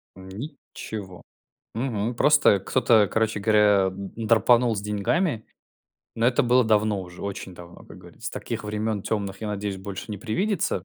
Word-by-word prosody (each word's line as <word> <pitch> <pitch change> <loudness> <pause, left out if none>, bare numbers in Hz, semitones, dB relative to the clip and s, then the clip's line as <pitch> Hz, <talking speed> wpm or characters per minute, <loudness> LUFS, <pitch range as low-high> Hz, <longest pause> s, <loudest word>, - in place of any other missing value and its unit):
Ничего. 95 - -8 0.5
Мгм. 115 -1 -2
Просто 150 -7 +4
кто-то, 110 0 +3
короче 110 -1 0
говоря, 105 -2 +4
драпанул 115 +4 +2
с 100 - -3
деньгами. 110 - -1 0.7
Но 115 +1 +1
это 125 +3 +3
было 125 +1 +4
давно 105 -2 +2
уже, 90 -1 -10
очень 95 -2 -6
давно, 85 0 -13
как - - -13
говорится. 90 +9 -9
Таких 115 -2 -5
времён 105 0 -2
тёмных, 100 -2 -3
я 110 - -4
надеюсь, 100 -2 -3
больше 100 +2 -7
не 105 - -5
привидится. 155 - -1
105 Hz, 145 wpm, -25 LUFS, 100-115 Hz, 0.7 s, Просто